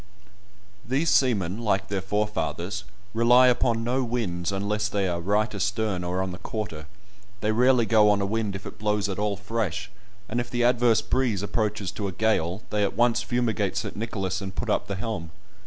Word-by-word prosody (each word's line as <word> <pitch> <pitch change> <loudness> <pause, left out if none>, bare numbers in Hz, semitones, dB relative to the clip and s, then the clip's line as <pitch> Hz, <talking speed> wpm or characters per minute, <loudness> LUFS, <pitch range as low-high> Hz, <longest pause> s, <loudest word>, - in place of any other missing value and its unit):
These 140 +6 +1
seamen, 105 -7 +2
like 100 -4 0
their 100 -1 -2
forefathers, 105 -2 -2 0.3
rely 120 +2 +6
upon 120 -2 +1
no 125 +3 0
winds 100 -7 -2
unless 105 +1 -1
they 100 -2 0
are 85 -1 -2
right 105 +5 +1
astern 100 -1 -1
or 90 +2 -1
on 95 - -3
the 90 - -8
quarter; 80 -9 -5 0.5
they 105 - +1
rarely 125 +1 +4
go 110 -2 +5
on 105 -1 +3
a 100 - 0
wind 105 -1 -1
if 100 - -7
it - - -9
blows 105 -1 +1
at 95 0 -4
all 105 -1 0
fresh, 100 -2 -3 0.4
and 120 - -1
if 120 0 -3
the 120 0 0
adverse 120 -3 +4
breeze 115 -5 0
approaches 105 -3 -1
to 100 - -3
a - - -3
gale, 95 -1 0
they 105 - +1
at 100 - 0
once 120 -1 +3
fumigate 115 -5 0
St. 95 - -3
Nicholas, 95 -3 -3
and 95 -1 -6
put - - -2
up - - 0
the 100 - -3
helm. 95 -5 -4
105 Hz, 190 wpm, -26 LUFS, 95-115 Hz, 0.5 s, rely